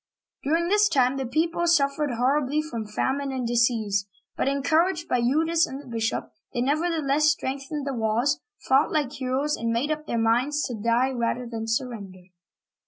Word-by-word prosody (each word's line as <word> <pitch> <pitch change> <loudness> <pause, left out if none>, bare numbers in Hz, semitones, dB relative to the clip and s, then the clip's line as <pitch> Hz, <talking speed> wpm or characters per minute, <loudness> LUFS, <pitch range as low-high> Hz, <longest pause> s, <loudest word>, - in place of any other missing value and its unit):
During 330 +4 +1
that 415 +1 +4
time 255 0 +3
the 265 -2 -2
people 330 +5 0
suffered 295 -2 +2
horribly 270 +4 +1
from 235 -9 -4
famine 270 +6 -1
and 260 -2 -3
disease; 225 -4 +1 0.3
but, - - -1
encouraged 315 +5 +1
by 250 - +1
Eudes 320 +7 +2
and 265 - -7
the 290 - -12
bishop, 230 -2 -2 0.2
they 240 - +1
nevertheless 305 +1 +1
strengthened 280 -1 -1
the 275 - -2
walls, 235 +6 +1 0.3
fought 270 +3 +4
like 295 -5 0
heroes, 265 +3 -1
and 230 - -3
made 245 +7 0
up 305 0 -3
their 235 - -1
minds 245 +6 +2
to 250 - -3
die 235 +4 +1
rather 245 0 -1
than 225 -1 -5
surrender. 210 -6 -4
270 Hz, 170 wpm, -25 LUFS, 235-300 Hz, 0.3 s, that